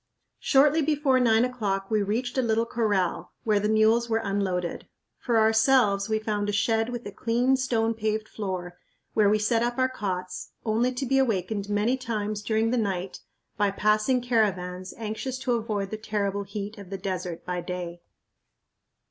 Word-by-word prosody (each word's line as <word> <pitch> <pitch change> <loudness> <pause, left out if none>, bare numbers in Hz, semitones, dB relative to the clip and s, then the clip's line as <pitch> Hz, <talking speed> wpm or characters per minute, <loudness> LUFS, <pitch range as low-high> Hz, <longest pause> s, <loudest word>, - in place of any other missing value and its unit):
Shortly 295 +3 +4
before 290 -3 +2
nine 230 -1 +4
o'clock 205 -5 -2
we 215 -1 +3
reached 230 +5 -2
a 260 - +2
little 230 -1 +1
corral, 210 -6 -1
where 210 -2 +2
the 210 +1 0
mules 220 +2 +3
were 225 - +2
unloaded. 195 -5 -2 0.3
For 235 -2 +1
ourselves 220 -2 +4
we 220 - +2
found 210 -1 -2
a - - +1
shed 225 +2 +1
with 240 -1 -5
a 205 - -5
clean, 240 +5 +1
stone 230 -3 +1
paved 220 -1 -2
floor, 185 -5 -5 0.3
where 210 -2 +4
we 210 - +4
set 225 +2 +1
up 240 +1 -1
our 260 0 +3
cots, 185 -7 -4
only 230 +3 +2
to 255 +2 -3
be 270 +1 +2
awakened 205 -4 0
many 210 +5 +1
times 215 -4 -3
during 220 +1 +1
the 250 - +1
night 195 -3 -2 0.4
by 205 -1 +3
passing 215 +5 +2
caravans 185 -6 0
anxious 230 +4 -4
to 260 -1 -2
avoid 215 -4 -2
the 215 - -3
terrible 205 -2 -2
heat 205 +2 -6
of 200 -3 -10
the 195 - -4
desert 180 -3 -4
by 180 -1 -2
day. 175 -1 -6
215 Hz, 175 wpm, -26 LUFS, 200-235 Hz, 0.4 s, Shortly